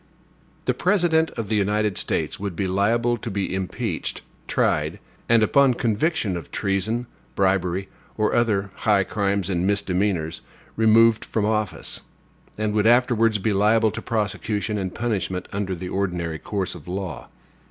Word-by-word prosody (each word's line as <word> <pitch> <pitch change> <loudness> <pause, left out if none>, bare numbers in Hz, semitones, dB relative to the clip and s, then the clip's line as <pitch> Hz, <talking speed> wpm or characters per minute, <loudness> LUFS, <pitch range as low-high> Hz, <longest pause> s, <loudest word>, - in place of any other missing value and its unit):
The - - +2
President 175 -4 +2
of 115 -3 -3
the 110 - 0
United 105 0 +1
States - - -1
would 100 -3 -4
be 95 - -1
liable 115 +6 +1
to 115 - -6
be 100 -2 -2
impeached, 95 -1 -3 0.2
tried, - - +1 0.3
and, 115 -1 +5
upon 135 +3 +4
conviction 115 - 0
of 85 - -6
treason, 110 +4 -1 0.3
bribery, 95 -1 +1 0.3
or 110 -1 +1
other 100 -4 +1
high 105 -4 +3
crimes 100 -1 -1
or 100 - -1
misdemeanors, 95 -3 0 0.3
removed 115 0 +5
from 110 -2 -1
office; 105 -5 -2 0.6
and 110 0 -1
would 105 0 +3
afterwards 115 -2 +4
be 105 +1 0
liable 110 +2 +3
to - - -6
prosecution 105 -1 -2
and 95 -2 -4
punishment 100 -6 -2
in 100 0 -2
the 90 -1 -4
ordinary 85 -5 -2
course 95 -3 -3
of 85 -3 -12
law. 90 -5 -5
105 Hz, 145 wpm, -23 LUFS, 95-115 Hz, 0.6 s, and